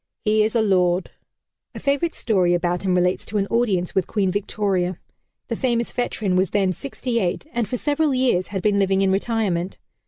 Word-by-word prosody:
He 215 0 +3
is 220 +2 -1
a 225 - +3
lord!" 180 -3 +2 0.6
A - - -5
favorite 285 +4 0
story 185 -6 +2
about 175 0 -1
him 185 -2 +1
relates 180 0 +1
to 215 - -2
an 200 - +1
audience 205 -7 +1
with 190 -3 0
Queen 195 -4 0
Victoria. 190 -3 -1 0.5
The - - -2
famous 235 -3 0
veteran 215 -6 -1
was 185 +1 +2
then 195 -2 +1
sixty 250 - -3
eight 180 -5 -2
and 235 -3 -1
for 250 - -2
several 295 +3 +1
years 255 -9 +1
had 195 -2 -4
been 205 -1 +2
living 195 0 +2
in 195 -1 +3
retirement. 195 -3 -1
200 Hz, 190 wpm, -22 LUFS, 185-235 Hz, 0.6 s, He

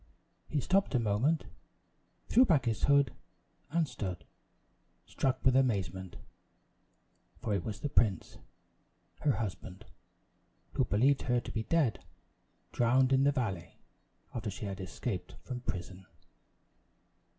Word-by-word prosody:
He 150 - 0
stopped 190 +3 +2
a - - +4
moment, 115 +9 +1 0.8
threw 250 - +6
back 155 - +3
his 115 -2 +1
hood, 140 -3 +4 0.6
and 165 +1 +1
stood, 95 -9 -5 0.8
struck 130 -1 -1
with 130 -1 +5
amazement; 95 -8 0 1.2
for 110 - -2
it 95 -4 0
was 110 0 -5
the 145 - -2
prince, 100 -6 +1 0.8
her 145 - +2
husband, 95 -2 -5 0.9
who - - +2
believed 135 +7 +3
her 125 0 +4
to - - -7
be 110 - -2
dead 155 -9 +1 0.7
drowned 130 +2 +3
in 135 +1 +4
the 145 - +5
valley, 95 - -3 0.6
after 110 -3 -3
she 100 +2 -6
had 100 -1 -5
escaped 95 0 -4
from 125 -1 -5
prison! 95 -3 -6
120 Hz, 125 wpm, -32 LUFS, 95-135 Hz, 1.2 s, threw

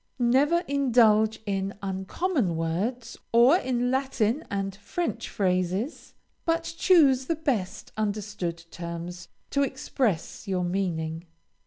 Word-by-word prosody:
Never 270 +7 +3
indulge 225 -6 +4
in 195 -1 -2
uncommon 195 - -1
words, 205 +9 -2
or 240 +8 +6
in 250 -5 0
Latin 265 0 0
and 195 -1 -2
French 235 +3 -3
phrases, 185 - -1 0.3
but 330 0 +1
choose 280 -9 +4
the 330 - +1
best 255 - -2
understood 205 -5 -3
terms 170 0 -6 0.2
to 280 - +2
express 255 - -1
your 185 -2 0
meaning. 170 -3 -2
215 Hz, 110 wpm, -27 LUFS, 185-265 Hz, 0.3 s, or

